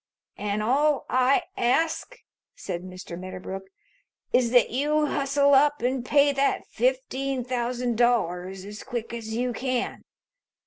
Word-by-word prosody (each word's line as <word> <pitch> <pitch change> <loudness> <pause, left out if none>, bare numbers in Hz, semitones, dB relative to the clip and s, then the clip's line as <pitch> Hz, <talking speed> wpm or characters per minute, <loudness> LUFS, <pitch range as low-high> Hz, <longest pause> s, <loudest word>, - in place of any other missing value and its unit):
"And 210 0 -1
all 285 +5 +2
I 255 +2 +3
ask," 320 - 0 0.4
said 170 - -5
Mr. 185 -1 -8
Medderbrook, 185 +1 -7 0.7
"is 250 -2 +4
that 245 0 +4
you 300 +5 +1
hustle 280 0 +2
up 290 0 +4
and 255 0 0
pay 285 +2 +4
that 275 0 0
fifteen 275 - -1
thousand 245 -1 -2
dollars 190 -6 +1
as 210 +1 -8
quick 235 -1 -5
as 220 -1 -5
you 245 +1 -1
can. 255 +1 -2
250 Hz, 130 wpm, -26 LUFS, 220-280 Hz, 0.7 s, is